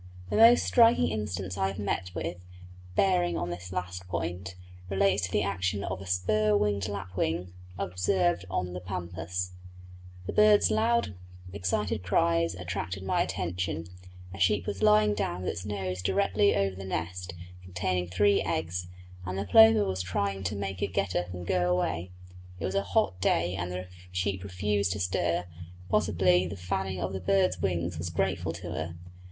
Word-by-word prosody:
The -, -, 0 dB
most 230 Hz, +2 st, +7 dB
striking 235 Hz, 0 st, +5 dB
instance 95 Hz, -3 st, -3 dB
I 95 Hz, -, +2 dB
have 95 Hz, -, -5 dB
met 100 Hz, -3 st, -2 dB
with, 85 Hz, +2 st, -3 dB, 0.6 s
bearing 180 Hz, -, +2 dB
on 85 Hz, -, -2 dB
this 90 Hz, +1 st, -7 dB
last 90 Hz, 0 st, -4 dB
point, 90 Hz, +2 st, -4 dB, 0.3 s
relates 95 Hz, -1 st, +2 dB
to -, -, -12 dB
the 105 Hz, -, +2 dB
action 100 Hz, 0 st, -1 dB
of 95 Hz, 0 st, -4 dB
a 95 Hz, -, -9 dB
spur 105 Hz, +4 st, +2 dB
winged 100 Hz, -2 st, 0 dB
lapwing 90 Hz, -3 st, -3 dB, 0.2 s
observed 90 Hz, -1 st, +1 dB
on 90 Hz, -1 st, -2 dB
the 90 Hz, -, -4 dB
Pampas. 90 Hz, -1 st, -4 dB, 0.7 s
The -, -, -4 dB
bird's 210 Hz, -1 st, +5 dB
loud 230 Hz, -, +2 dB, 0.4 s
excited 100 Hz, +2 st, -1 dB
cries 85 Hz, -2 st, +2 dB
attracted 90 Hz, +1 st, -4 dB
my 95 Hz, -, +1 dB
attention; 90 Hz, -2 st, -2 dB, 0.5 s
a 95 Hz, -, -8 dB
sheep 95 Hz, +1 st, +2 dB
was 95 Hz, +1 st, -4 dB
lying 105 Hz, 0 st, +5 dB
down 90 Hz, -3 st, -2 dB
with -, -, 0 dB
its 90 Hz, +3 st, -6 dB
nose 95 Hz, -3 st, -3 dB
directly 200 Hz, -, +2 dB
over 100 Hz, -1 st, 0 dB
the 95 Hz, -, -7 dB
nest, 90 Hz, -1 st, -4 dB, 0.3 s
containing 90 Hz, 0 st, -2 dB
three 100 Hz, +3 st, +3 dB
eggs, 85 Hz, +2 st, -2 dB, 0.4 s
and 90 Hz, +1 st, -4 dB
the 100 Hz, -, -2 dB
plover 110 Hz, +1 st, +7 dB
was 95 Hz, -1 st, -2 dB
trying 95 Hz, +2 st, -2 dB
to 100 Hz, +3 st, -1 dB
make 95 Hz, -2 st, -4 dB
it 100 Hz, -2 st, -2 dB
get 95 Hz, -2 st, 0 dB
up 90 Hz, 0 st, -1 dB
and 90 Hz, -1 st, -6 dB
go 90 Hz, 0 st, +1 dB
away. 90 Hz, 0 st, 0 dB, 0.5 s
It 80 Hz, -, -3 dB
was 95 Hz, -, -2 dB
a 100 Hz, -, +2 dB
hot 95 Hz, -1 st, 0 dB
day 85 Hz, -1 st, +2 dB
and 90 Hz, -1 st, -3 dB
the 90 Hz, 0 st, -4 dB, 0.3 s
sheep 95 Hz, +1 st, -1 dB
refused 100 Hz, 0 st, 0 dB
to 105 Hz, -, -5 dB
stir; 90 Hz, -1 st, 0 dB, 0.4 s
possibly 90 Hz, 0 st, +3 dB
the 95 Hz, -, -6 dB
fanning 95 Hz, +1 st, -2 dB
of 95 Hz, +1 st, -2 dB
the 95 Hz, -, -4 dB
bird's 190 Hz, -, +2 dB
wings 85 Hz, -3 st, -1 dB
was 85 Hz, +2 st, -3 dB
grateful 90 Hz, -1 st, -1 dB
to 85 Hz, 0 st, -7 dB
her. 85 Hz, 0 st, -4 dB
90 Hz, 170 wpm, -29 LUFS, 90-100 Hz, 0.7 s, most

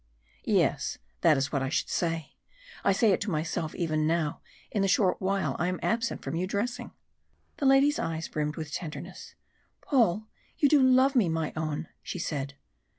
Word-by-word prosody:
"Yes, -, -, +1 dB, 0.2 s
that 155 Hz, -, +5 dB
is 135 Hz, +1 st, -1 dB
what 140 Hz, -, 0 dB
I 135 Hz, -, -1 dB
should 150 Hz, -, 0 dB
say 165 Hz, -3 st, -2 dB, 0.5 s
I -, -, +4 dB
say 205 Hz, +2 st, +4 dB
it 185 Hz, -, +1 dB
to 205 Hz, -, -2 dB
myself 160 Hz, -1 st, -2 dB
now -, -, -9 dB
even 155 Hz, -2 st, +1 dB, 0.6 s
in 205 Hz, -, 0 dB
the 195 Hz, -, +2 dB
short 185 Hz, -1 st, +2 dB
while 195 Hz, +1 st, 0 dB
I 175 Hz, -, +1 dB
am 185 Hz, 0 st, -2 dB
absent 230 Hz, +1 st, -1 dB
from -, -, -4 dB
you 180 Hz, +2 st, -1 dB
dressing!" 240 Hz, +5 st, -2 dB, 0.7 s
The 280 Hz, -, +1 dB
lady's 275 Hz, +2 st, +5 dB
eyes 165 Hz, -1 st, -2 dB
brimmed 150 Hz, 0 st, -2 dB
with 155 Hz, -2 st, -6 dB
tenderness. 175 Hz, +2 st, -7 dB, 0.5 s
"Paul! 220 Hz, -, +2 dB, 0.3 s
you 290 Hz, -, +4 dB
do 285 Hz, 0 st, +5 dB
love 260 Hz, +1 st, +5 dB
me, 215 Hz, -9 st, +4 dB
my 160 Hz, -1 st, -1 dB
own!" 155 Hz, 0 st, -3 dB
she -, -, -5 dB
said. 140 Hz, -4 st, -3 dB
180 Hz, 180 wpm, -28 LUFS, 155-230 Hz, 0.7 s, that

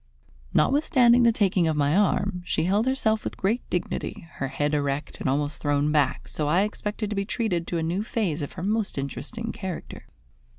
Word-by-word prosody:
Notwithstanding 255 Hz, -, +4 dB
the 235 Hz, -1 st, +6 dB
taking 190 Hz, -5 st, +2 dB
of 155 Hz, -1 st, 0 dB
my 145 Hz, +2 st, +2 dB
arm, 190 Hz, -2 st, +1 dB
she 160 Hz, -2 st, 0 dB
held 205 Hz, +7 st, +2 dB
herself 220 Hz, -5 st, +1 dB
with -, -, -5 dB
great 220 Hz, +6 st, +1 dB
dignity, 175 Hz, -1 st, -3 dB
her 135 Hz, -, -1 dB
head 145 Hz, +2 st, -1 dB
erect 145 Hz, 0 st, -1 dB
and -, -, -1 dB
almost 145 Hz, +2 st, -1 dB
thrown 145 Hz, +1 st, +1 dB
back, 150 Hz, -2 st, +1 dB
so 150 Hz, -, -3 dB
I 170 Hz, +5 st, +3 dB
expected 210 Hz, 0 st, -3 dB
to -, -, -1 dB
be 200 Hz, -, 0 dB
treated 200 Hz, -6 st, -1 dB
to 175 Hz, -, -1 dB
a 165 Hz, -, -1 dB
new 175 Hz, +5 st, -1 dB
phase 205 Hz, -, -1 dB
of 145 Hz, -, -5 dB
her 170 Hz, -, -6 dB
most 210 Hz, -2 st, -1 dB
interesting 225 Hz, -, -4 dB
character. 190 Hz, -4 st, -7 dB
180 Hz, 195 wpm, -26 LUFS, 150-220 Hz, -, the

